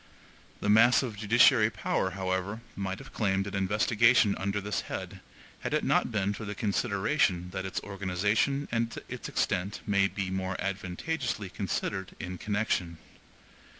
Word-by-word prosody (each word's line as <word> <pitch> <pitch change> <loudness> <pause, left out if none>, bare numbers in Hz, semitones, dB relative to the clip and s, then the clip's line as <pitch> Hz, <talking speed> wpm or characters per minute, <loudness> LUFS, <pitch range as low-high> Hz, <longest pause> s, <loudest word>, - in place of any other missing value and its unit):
The - - -2
mass 115 +6 +6
of 120 -5 -4
judiciary 110 +2 +5
power, 95 - -1
however, 95 +3 -2
might 95 -1 -3
have - - -12
claimed 95 -3 +1
an 100 - -6
investigation 105 +3 +3
under 100 +2 -1
this 105 +1 -2
head, 95 +1 -6 0.4
had - - -2
it - - +1
not - - +2
been 100 -2 0
for 105 - -7
the 100 -1 -5
consideration 100 - 0
that 95 0 -3
its 95 - -3
organization 100 +8 0
and 115 0 -1
its - - -6
extent 100 +4 -1
may 100 -1 +3
be 95 -2 -4
more 95 0 -2
advantageously 100 - -3
considered 95 -1 -3
in 90 -1 -6
connection. 105 -5 -1
100 Hz, 150 wpm, -29 LUFS, 95-110 Hz, 0.4 s, mass